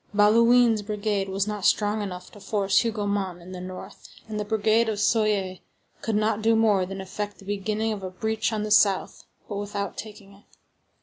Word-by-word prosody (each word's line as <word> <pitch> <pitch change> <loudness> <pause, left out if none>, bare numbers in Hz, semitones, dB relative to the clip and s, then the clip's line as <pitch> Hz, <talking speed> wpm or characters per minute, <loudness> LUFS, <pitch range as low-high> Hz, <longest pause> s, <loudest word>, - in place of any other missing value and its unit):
Bauduin's 230 +2 +5
brigade 205 -1 -2
was 195 +1 0
not 210 -2 -4
strong 210 +2 +2
enough 185 -3 -6
to 205 - -14
force 200 -1 +1
Hougomont 205 -5 -1
on 175 +2 -12
the 180 -1 -7
north, 185 0 -9 0.2
and 215 -1 -4
the - - -1
brigade 220 +2 +2
of 215 - -2
Soye 205 -3 +1 0.4
could 225 - -1
not 215 0 +1
do 225 +1 +3
more 210 -4 +3
than 195 +1 -6
effect 205 +2 -5
the 195 - -15
beginning 210 +2 -1
of 205 - -6
a 185 - -5
breach 220 +5 -2
on 215 -1 -2
the 210 - -4
south, 200 -2 +3 0.2
but 205 - -4
without 200 0 -4
taking 205 -2 -9
it. 195 - -20
205 Hz, 190 wpm, -25 LUFS, 195-220 Hz, 0.4 s, Bauduin's